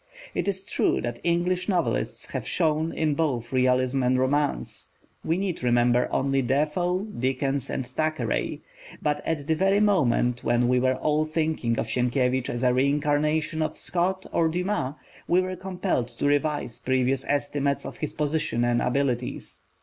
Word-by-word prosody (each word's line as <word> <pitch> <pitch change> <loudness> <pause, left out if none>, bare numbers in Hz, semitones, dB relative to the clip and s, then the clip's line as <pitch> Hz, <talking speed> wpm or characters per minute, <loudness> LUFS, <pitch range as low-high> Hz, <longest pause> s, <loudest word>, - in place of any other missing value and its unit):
It - - -2
is 195 -1 -1
true - - +1
that 120 0 -4
English 175 +2 0
novelists 180 -4 -1
have - - -4
shone 160 -1 +1
in 155 -2 0
both 135 -6 -1
realism 130 +1 +2
and 125 0 +2
romance: 140 +3 -1 0.3
we 165 +2 0
need 190 -3 -2
remember 120 0 +3
only 135 0 +1
Defoe, 155 +8 0
Dickens, 135 - -2
and 130 - -2
Thackeray. 145 -1 -2 0.4
But 150 0 -1
at 150 -3 -1
the 160 - +2
very 195 +5 +3
moment 125 - +2
when 120 +1 +2
we 125 0 +3
were 130 +1 +2
all 150 +3 +1
thinking 155 -7 -1
of - - 0
Sienkiewicz 125 0 0
as 120 +1 -3
a 125 -1 +4
reincarnation 150 +4 +1
of 155 - -2
Scott 185 +2 -1
or 165 -1 +3
Dumas, 180 -5 -1 0.3
we 175 - +4
were 185 0 -2
compelled 180 -8 -2
to 120 +3 -5
revise 145 -3 0
previous 130 0 +1
estimates 145 -1 0
of - - -7
his 150 - -4
position 150 -4 0
and 120 0 +2
abilities. 125 -1 -2
145 Hz, 155 wpm, -26 LUFS, 125-165 Hz, 0.4 s, a